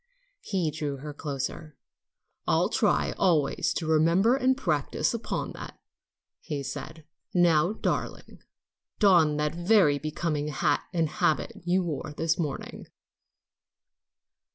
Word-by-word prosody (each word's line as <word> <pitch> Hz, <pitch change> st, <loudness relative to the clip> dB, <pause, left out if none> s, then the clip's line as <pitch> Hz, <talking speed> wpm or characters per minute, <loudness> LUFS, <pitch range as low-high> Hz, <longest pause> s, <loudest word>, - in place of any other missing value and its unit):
He 180 Hz, -6 st, -1 dB
drew 145 Hz, -2 st, -4 dB
her 145 Hz, +2 st, -7 dB
closer. 145 Hz, +1 st, -5 dB, 0.7 s
"I'll -, -, +2 dB
try -, -, +1 dB
always 160 Hz, -7 st, +2 dB
to 165 Hz, -, -2 dB
remember 165 Hz, +9 st, +3 dB
and 260 Hz, -1 st, +2 dB
practice 155 Hz, -, 0 dB
upon 235 Hz, -, -3 dB
that," -, -, -9 dB, 0.6 s
he 145 Hz, -4 st, -4 dB
said, 150 Hz, +3 st, -7 dB, 0.3 s
"Now, 175 Hz, +1 st, +4 dB
darling, -, -, -4 dB, 0.6 s
don 170 Hz, -8 st, +4 dB
that 150 Hz, 0 st, 0 dB
very 175 Hz, -4 st, +3 dB
becoming 155 Hz, 0 st, -2 dB
hat 145 Hz, 0 st, +1 dB
and 165 Hz, -3 st, +1 dB
habit 155 Hz, 0 st, 0 dB
you 180 Hz, +1 st, +2 dB
wore 150 Hz, -3 st, -4 dB
this 165 Hz, +1 st, 0 dB
morning." 150 Hz, -5 st, -4 dB
155 Hz, 115 wpm, -27 LUFS, 150-175 Hz, 0.7 s, Now